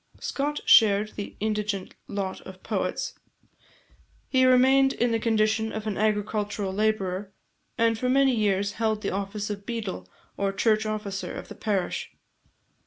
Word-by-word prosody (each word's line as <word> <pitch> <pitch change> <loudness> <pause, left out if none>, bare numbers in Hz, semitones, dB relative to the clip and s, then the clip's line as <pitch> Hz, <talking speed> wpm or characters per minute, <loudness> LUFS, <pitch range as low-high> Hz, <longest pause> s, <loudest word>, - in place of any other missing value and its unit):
Scott 290 +2 -2
shared 210 -2 +6
the 205 -1 -7
indigent 210 -2 -2
lot 195 -2 -4
of 185 0 -12
poets. - - -2 1.1
He 260 -1 +4
remained 265 +2 +5
in 240 0 +1
the 225 - +1
condition 220 0 +1
of 220 0 -5
an 215 -2 -2
agricultural 210 -2 -1
labourer, 200 -2 -1 0.5
and 230 -1 +2
for 250 - 0
many 270 0 +4
years 200 -2 +1
held 220 -1 -1
the - - -1
office 200 +2 -3
of 200 -1 -6
beadle, 205 - -5 0.3
or 200 -1 0
church 215 +1 +2
officer, 210 -2 -4
of - - -8
the - - -8
parish. 215 - -2
215 Hz, 145 wpm, -26 LUFS, 200-230 Hz, 1.1 s, shared